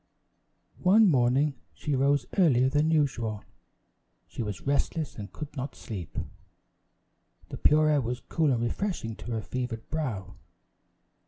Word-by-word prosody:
One 205 +4 +6
morning, 135 0 +3 0.2
she 150 - -3
rose 140 0 +2
earlier 130 -8 +5
than 150 +3 +2
usual. 125 -9 0 0.8
She - - -6
was 105 -3 -5
restless 145 +3 0
and 100 -3 -7
could 150 -1 -8
not 135 0 -4
sleep. 95 - -7 1.3
The - - -6
pure 155 0 +4
air 150 -2 +3
was 125 0 -3
cool 160 -4 +1
and 120 -2 +1
refreshing 120 - -2
to - - -11
her 110 -1 -2
fevered 125 -2 -4
brow. 110 - -3
135 Hz, 135 wpm, -28 LUFS, 115-150 Hz, 1.3 s, One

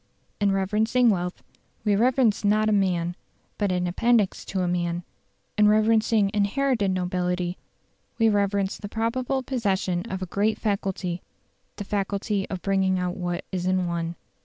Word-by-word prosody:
In 205 -1 +3
reverencing 220 +5 +2
wealth 180 -2 -3 0.4
we 205 -1 +3
reverence 240 -1 +3
not 215 +1 +3
a - - +2
man, 180 -4 +1 0.4
but 205 -3 +1
an 180 0 0
appendix 215 +3 +2
to 190 - -2
a - - 0
man; 175 0 -1 0.6
in 210 - +6
reverencing 215 -1 +3
inherited 210 +1 +1
nobility, 180 -1 -1 0.6
we 225 - +4
reverence 200 -2 +1
the 205 - -7
probable 250 +4 -1
possession 195 -8 0
of 190 -2 -3
a - - -2
great 210 +4 0
faculty 195 -4 -2 0.5
the 205 - -5
faculty 200 0 -2
of 185 -2 -5
bringing 190 -1 +2
out 180 0 -2
what 175 -1 -3
is 185 -1 -2
in 185 -1 +1
one. 170 0 -2
195 Hz, 150 wpm, -25 LUFS, 180-215 Hz, 0.6 s, in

